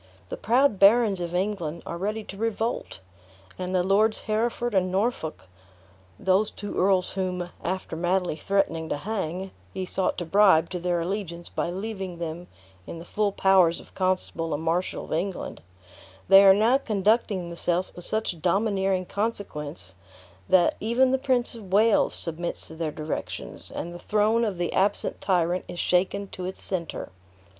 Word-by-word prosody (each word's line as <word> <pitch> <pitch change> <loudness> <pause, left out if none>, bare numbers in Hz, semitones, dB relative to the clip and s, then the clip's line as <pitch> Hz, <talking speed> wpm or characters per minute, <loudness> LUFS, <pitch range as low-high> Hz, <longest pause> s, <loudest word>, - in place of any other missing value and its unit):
The - - -3
proud 245 -2 +2
barons 205 -1 +5
of 175 0 -4
England 180 -4 -2
are - - -5
ready 215 +3 -2
to 195 - -9
revolt; 225 - -2 0.6
and 185 0 -2
the 180 - +3
Lords 210 +4 +2
Hereford 235 +2 -1
and 185 -2 +2
Norfolk 195 -5 -1 0.7
(those 190 +3 +2
two 205 - -7
earls 185 -1 +2
whom, 180 -2 -3
after 185 -1 -3
madly 175 0 0
threatening 165 -3 0
to - - -1
hang, 190 0 -4 0.2
he 190 - -4
sought 185 +1 0
to 175 - -3
bribe 185 -3 +4
to 180 - -3
their 175 -1 0
allegiance 175 -2 -4
by - - -2
leaving 190 -1 -5
them 170 +1 -5 0.4
in - - -6
the 165 - -9
full 205 +2 0
powers 190 -4 +4
of - - -16
Constable 185 -4 -1
and 150 - -5
Marshal 170 +3 -1
of - - -5
England), 180 - -3 0.7
they 195 +1 +9
are 195 -1 +8
now 230 +6 +4
conducting 210 -4 +1
themselves 175 +1 -1
with 175 - -7
such 215 -6 -2
domineering 195 0 +1
consequence, 150 - -3 0.6
that 180 -2 +4
even 245 +4 +2
the 265 - +2
Prince 255 -2 +1
of 210 -6 -11
Wales 215 +2 +4
submits 170 +1 -2
to 160 - -7
their 160 -1 -2
directions, 155 +1 -5
and 175 - -5
the 175 - -8
throne 215 +4 +2
of 200 -5 -2
the 175 -1 -2
absent 200 +2 0
tyrant 180 -1 +1
is - - -8
shaken 190 +2 +1
to 180 - -6
its 190 - -4
center. 175 -4 -3
190 Hz, 165 wpm, -26 LUFS, 175-210 Hz, 0.7 s, they